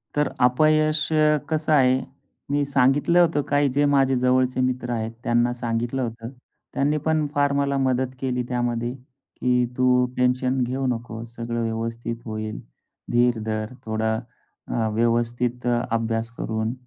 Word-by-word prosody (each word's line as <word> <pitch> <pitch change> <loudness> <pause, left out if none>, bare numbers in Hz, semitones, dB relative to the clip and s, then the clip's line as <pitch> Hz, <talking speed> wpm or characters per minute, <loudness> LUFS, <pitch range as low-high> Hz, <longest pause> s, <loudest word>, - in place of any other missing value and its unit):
तर 150 -1 +2
अपयश 155 +4 +3 0.4
कसं 155 0 0
आहे, 130 -2 +4 0.5
मी 145 0 +2
सांगितलं 140 +5 +3
होतं 165 -4 +3
काही 145 -1 +3
जे 145 +3 +2
माझे 135 -2 +3
जवळचे 130 0 +2
मित्र 125 -1 -1
आहेत 115 -1 -2
त्यांना 120 +1 +2
सांगितलं 120 +1 -2
होतं. 115 -1 -5 0.4
त्यांनी 145 +2 +1
पण 160 -1 +2
फार 145 0 +2
मला 140 0 +1
मदत 130 -1 0
केली 125 -2 -1
त्यामध्ये, 120 -1 -1 0.5
की 125 -1 +2
तू 125 0 +4
टेन्शन 125 +1 +1
घेऊ 130 +2 -2
नकोस. 115 -1 -5
सगळं 115 0 -3
व्यवस्थित 115 +1 -3
होईल. 110 -1 -5 0.5
धीर 120 -1 +3
धर 110 +2 -3
थोडा, 110 0 0 0.5
अ, 115 -2 -1
व्यवस्थित 120 +2 0 0.2
अभ्यास 115 0 -1
करून 110 +1 -2
125 Hz, 135 wpm, -23 LUFS, 115-135 Hz, 0.5 s, आहे